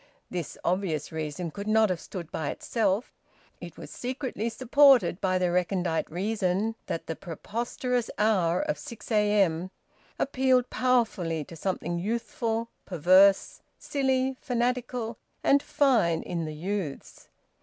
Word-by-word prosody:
This 175 -4 -4
obvious 175 -5 -1
reason 160 +2 -4
could 200 +5 -7
not 215 -2 +4
have 180 - -2
stood 170 -2 -8
by 155 -3 -2
itself; 215 -1 -1 0.5
it - - -10
was - - -9
secretly 250 -3 -3
supported 260 -4 +4
by 185 -2 +2
the 180 -1 +1
recondite 180 -2 0
reason 195 +3 0
that 165 - -3
the 160 - -4
preposterous 235 +7 -3
hour 185 -5 +2
of 300 0 -2
6 235 0 -9
a.m. 200 -5 +2 0.5
appealed 260 -2 +2
powerfully 220 -11 +1
to 165 - -11
something 175 0 -2
youthful, 230 +2 -2
perverse, 185 +3 +4 0.2
silly, 265 -2 0
fanatical, 245 -1 -1 0.2
and 280 0 +5
fine 225 - +2
in 170 -2 -3
the 155 -1 -6
youths. 180 -2 -5
205 Hz, 125 wpm, -27 LUFS, 175-240 Hz, 0.5 s, and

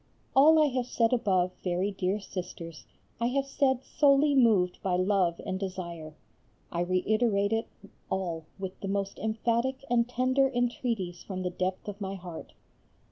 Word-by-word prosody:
All 305 +4 +7
I 305 - +6
have 250 -2 -2
said 230 -1 +2
above, 190 -7 +2
very 185 +2 0
dear 195 +1 -1
Sisters, 175 -7 -7 0.3
I 235 - +1
have 270 +2 0
said 265 -2 +1
solely 285 0 +4
moved 215 -9 +3
by 185 -2 0
love 185 -2 +1
and 190 0 -2
desire. 170 -5 -6 0.6
I 170 - -1
reiterate 200 +3 +1
it 225 0 0 0.4
all 175 -4 -2
with 190 -1 -6
the 195 - -5
most 195 0 -2
emphatic 235 +5 -1
and 235 0 +3
tender 260 +2 +2
entreaties 240 -7 -2
from 185 -2 -5
the 180 - -2
depth 185 +2 -3
of 205 0 -6
my 195 0 -3
heart. 175 -3 -9
200 Hz, 155 wpm, -29 LUFS, 185-245 Hz, 0.6 s, All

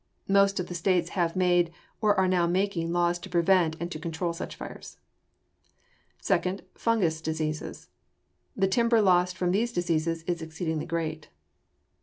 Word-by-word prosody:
Most 200 0 +4
of 180 - -1
the 175 - -7
states 175 +1 +1
have 170 -3 -1
made 175 -2 +3 0.3
or 210 -2 +4
are 190 0 +3
now 180 -2 +2
making 175 -2 0
laws 175 0 +1
to 185 - -10
prevent 175 -2 +3
and 170 +1 -4
to 155 - -5
control 170 +2 -3
such 165 - -6
fires. - - -9 1.2
Second, 185 +1 0
fungous 180 -9 0
diseases. 155 -1 -4 0.7
The 195 -1 +3
timber 230 +3 +3
loss 180 -3 +4
from 180 -1 -1
these 225 +5 +1
diseases 165 -4 -1
is 170 0 -2
exceedingly 160 0 -3
great. 160 -2 -3
175 Hz, 150 wpm, -27 LUFS, 165-190 Hz, 1.2 s, Most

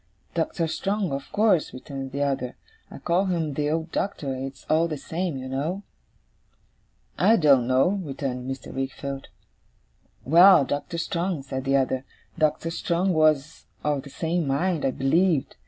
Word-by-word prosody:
'Doctor 165 0 -1
Strong, 195 +2 -1
of 135 0 -5
course,' 205 -6 +2
returned 135 0 -7
the 140 +1 -1
other; 135 -3 -2 0.3
'I - - -10
call 180 +3 +1
him 165 -5 -1
the 145 +1 -1
old 160 +1 -2
Doctor; 150 -9 -2
it's 135 0 -7
all 160 +2 +3
the 155 -2 -4
same, 165 +1 -3
you 130 0 -6
know.' 155 +9 -3 1.4
'I 225 - +6
don't 140 - +4
know,' 135 +10 +3
returned 135 -3 -4
Mr. 135 0 -6
Wickfield. 135 +1 -4 1.0
'Well, 170 +1 +7
Doctor 145 +5 -3
Strong,' 170 -2 -2
said 130 0 -5
the 135 +1 +2
other 130 -1 0 0.3
'Doctor 160 +1 0
Strong 175 +2 0
was 155 -2 +1 0.2
of 145 -2 0
the 140 - -12
same 165 +2 -1
mind, 160 +4 0
I - - +3
believed. 150 +4 +1
150 Hz, 155 wpm, -25 LUFS, 135-170 Hz, 1.4 s, Well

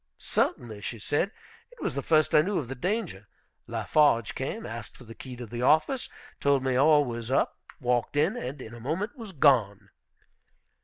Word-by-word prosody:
"Certainly," 110 -4 -1
she 115 - -5
said, 145 - 0 0.4
"it - - -19
was 170 - -2
the 140 - -2
first 155 +1 +3
I 150 - +7
knew 195 +5 -1
of 140 - -2
the 135 - -4
danger. 170 - -3 0.4
Lafarge 145 -8 +2
came, - - -4
asked - - -8
for - - -13
the 115 -1 -11
key 125 +2 -9
of 120 -3 -8
the 120 0 -4
office, 160 - +2 0.3
told 140 -2 +2
me 130 -1 +1
all 145 +2 +5
was 120 -2 -5
up, 135 - +1 0.2
walked 125 +2 0
in, 160 +10 +3
and 135 - -5
in 110 - -10
a 120 - -9
moment 170 - -3
was 225 -6 -8
gone." 110 - +3
135 Hz, 190 wpm, -28 LUFS, 120-155 Hz, 0.4 s, I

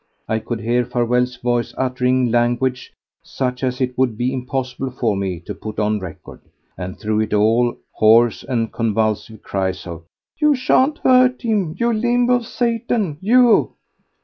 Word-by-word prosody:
I 110 - 0
could 115 +1 -5
hear 120 +2 +1
Farewell's 125 +1 0
voice 120 -1 -2
uttering 125 -1 +1
language 120 +2 0 0.3
such 125 -1 -4
as 125 -1 -1
it 125 -1 -1
would 125 -5 +1
be 125 +2 -1
impossible 130 0 -3
for 120 -4 -1
me 95 -3 -3
to 105 - -7
put 110 +2 -8
on 105 0 0
record; 95 -5 -10 0.3
and 95 0 -6
through 110 0 -1
it 110 -1 0
all 115 +3 +2
hoarse 115 +1 +4
and 115 -4 -2
convulsive 110 -1 -1
cries 95 -1 -3
of: 85 -2 -8 0.4
"You 300 -2 +4
shan't 265 +3 +2
hurt 255 0 +4
him—you 220 0 0
limb 240 +2 +1
of 245 -2 +1
Satan, 230 - -1
you!" 240 +3 +4
125 Hz, 150 wpm, -19 LUFS, 110-170 Hz, 0.4 s, hoarse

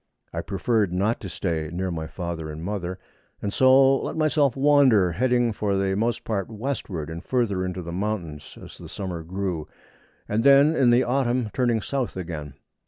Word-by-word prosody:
I - - -2
preferred 105 0 0
not 100 +6 0
to 95 - -7
stay 80 -2 -2
near 90 +2 -2
my 80 -2 -4
father 85 -3 -5
and 75 +1 -7
mother, 95 -2 -4 0.4
and 100 - -4
so 135 +1 +5
let - - -4
myself 150 -4 +2
wander, 135 -10 +4
heading 120 +4 +1
for 105 -1 -1
the 95 0 0
most 115 +3 -1
part 100 -4 -2
westward, 110 - -4
and 80 +2 -7
further 110 -7 0
into 90 -1 -4
the 85 - -6
mountains 90 -6 -4
as - - -12
the - - -10
summer 90 -4 -5
grew, 90 -2 -4 0.6
and 110 +2 0
then 140 +3 +6
in 130 -5 +4
the 120 +2 +5
autumn 125 -3 0
turning 120 -3 +1
south 135 -7 -3
again. 80 -6 -6
100 Hz, 175 wpm, -24 LUFS, 90-125 Hz, 0.6 s, then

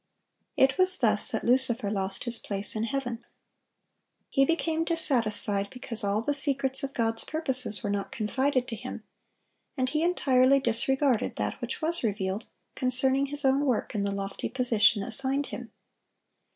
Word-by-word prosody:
It 270 +6 +3
was 370 0 +8
thus 215 -7 +3
that - - -3
Lucifer 240 -4 +1
lost 195 -2 -2
his 240 -1 -1
place 200 +1 -3
in 220 +1 -1
heaven. 245 -2 -4 1.1
He 275 - +3
became 325 +1 0
dissatisfied 225 - 0
because 235 -2 +2
all 205 +2 0
the 290 - 0
secrets 275 -2 +2
of 275 0 -5
God's 225 -1 -1
purposes 260 - -2
were 205 - -2
not 200 -1 -3
confided 255 +4 -1
to 230 - -4
him, 210 - -8 0.7
and 255 0 0
he 305 +3 -1
entirely 275 -6 +3
disregarded 265 +1 0
that - - -4
which - - -5
was 335 +2 0
revealed 200 -1 -2 0.3
concerning 265 +2 +2
his 290 +1 -4
own 270 +2 +3
work 255 -6 -1
in 205 - -1
the 200 - -1
lofty 195 0 -5
position 235 -4 +2
assigned 270 +5 -1
him. 245 -5 -8
255 Hz, 155 wpm, -27 LUFS, 215-275 Hz, 1.1 s, was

